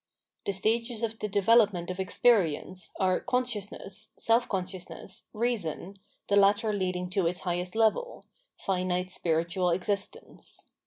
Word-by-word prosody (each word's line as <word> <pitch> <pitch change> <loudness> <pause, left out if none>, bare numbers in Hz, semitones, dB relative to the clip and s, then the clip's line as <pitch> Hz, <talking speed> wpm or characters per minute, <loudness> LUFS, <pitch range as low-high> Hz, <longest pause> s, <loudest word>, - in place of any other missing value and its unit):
The - - +2
stages 230 +4 0
of 225 -1 -2
the 210 - -2
development 200 -3 +3
of 185 - -7
experience 185 -3 +1
are 185 -2 +2
Consciousness, 220 -4 -2
Self 230 +2 +2
consciousness, 185 0 -5
Reason, 200 -5 -2 0.3
the 200 - +2
latter 205 +2 +4
leading 185 -2 -1
to 190 -3 +1
its 175 +1 -2
highest 180 +1 -2
level 225 - +1 0.2
— - - -44
finite 185 -1 0
Spiritual 170 +2 0
existence. 200 - -3
195 Hz, 125 wpm, -29 LUFS, 180-220 Hz, 0.3 s, latter